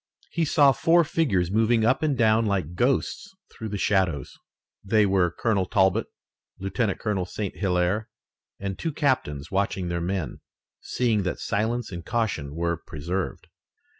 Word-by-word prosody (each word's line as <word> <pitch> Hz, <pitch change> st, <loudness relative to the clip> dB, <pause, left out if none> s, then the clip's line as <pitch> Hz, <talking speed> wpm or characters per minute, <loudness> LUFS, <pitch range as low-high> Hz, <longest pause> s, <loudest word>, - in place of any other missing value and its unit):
He 165 Hz, -1 st, 0 dB
saw 145 Hz, -2 st, +5 dB
four 165 Hz, +6 st, +4 dB
figures 100 Hz, -, 0 dB
moving 110 Hz, +1 st, +3 dB
up 130 Hz, -, +3 dB
and 150 Hz, -4 st, +1 dB
down 110 Hz, -1 st, +3 dB
like 95 Hz, -5 st, -1 dB
ghosts 135 Hz, -, 0 dB, 0.2 s
through 110 Hz, -, -6 dB
the 105 Hz, -, -3 dB
shadows. 95 Hz, -9 st, 0 dB, 0.5 s
They 105 Hz, +1 st, +3 dB
were 95 Hz, -3 st, +3 dB
Colonel 95 Hz, +1 st, 0 dB
Talbot, 95 Hz, +2 st, +2 dB, 0.5 s
Lieutenant 95 Hz, +2 st, -1 dB
Colonel 95 Hz, -4 st, -2 dB
St. 100 Hz, +2 st, -4 dB
Hilaire, 95 Hz, +3 st, 0 dB, 0.5 s
and 100 Hz, -1 st, -4 dB
two 165 Hz, -, -2 dB
captains 105 Hz, -, -1 dB
watching 95 Hz, -2 st, -1 dB
their 85 Hz, 0 st, -2 dB
men, 90 Hz, -1 st, -3 dB, 0.4 s
seeing 115 Hz, -4 st, 0 dB
that 90 Hz, -2 st, -2 dB
silence 115 Hz, +2 st, -1 dB
and 85 Hz, -2 st, -6 dB
caution 100 Hz, -12 st, -2 dB
were 85 Hz, 0 st, -1 dB
preserved. 85 Hz, +3 st, -4 dB
100 Hz, 145 wpm, -25 LUFS, 90-115 Hz, 0.5 s, saw